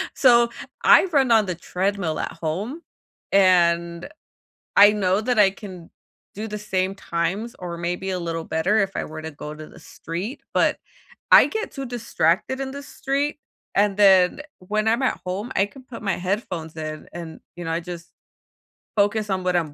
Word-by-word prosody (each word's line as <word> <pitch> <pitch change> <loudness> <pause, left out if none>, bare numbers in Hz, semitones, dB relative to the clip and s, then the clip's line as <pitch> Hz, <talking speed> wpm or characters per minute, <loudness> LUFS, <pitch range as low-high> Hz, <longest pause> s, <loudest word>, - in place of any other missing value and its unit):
So, 240 -3 +5 0.3
I - - +7
run 280 -9 +2
on 220 -2 +5
the 180 -2 -3
treadmill 180 -1 -2
at - - -3
home, 190 - -4 0.5
and 170 -3 +3 0.7
I 205 +1 +8
know 195 -1 +1
that 245 0 0
I 200 -2 +6
can 190 -4 -11 0.4
do 215 +2 -5
the 210 0 -5
same 190 -2 -1
times 190 +5 -3
or 175 -2 -6
maybe 175 +3 -3
a 185 - -2
little 165 -1 -3
better 180 +8 +1
if 195 -2 0
I - - -2
were 155 0 -8
to 160 - -5
go 150 0 -8
to 155 0 -10
the - - -15
street, 185 - -6
but - - +3 0.6
I - - +9
get 440 0 -4
too 275 - -6
distracted 235 -1 0
in 265 0 -4
the 280 +1 -7
street, 280 +2 -2 0.4
and 200 0 +2
then, 190 +2 +5 0.2
when 215 +4 -1
I'm 230 +4 +2
at 260 - 0
home 195 +7 -4
I 195 - +3
can 260 +5 -15
put 250 -2 -10
my 195 -4 0
headphones 180 -4 -3
in 155 -1 -6
and, 170 -2 -8 0.2
you 175 - -6
know, 165 - -2
I 165 +1 -1
just 175 0 -8 0.9
focus 205 +1 +1
on 190 -1 -1
what 180 0 0
I'm 160 -4 0
190 Hz, 180 wpm, -23 LUFS, 170-220 Hz, 0.9 s, I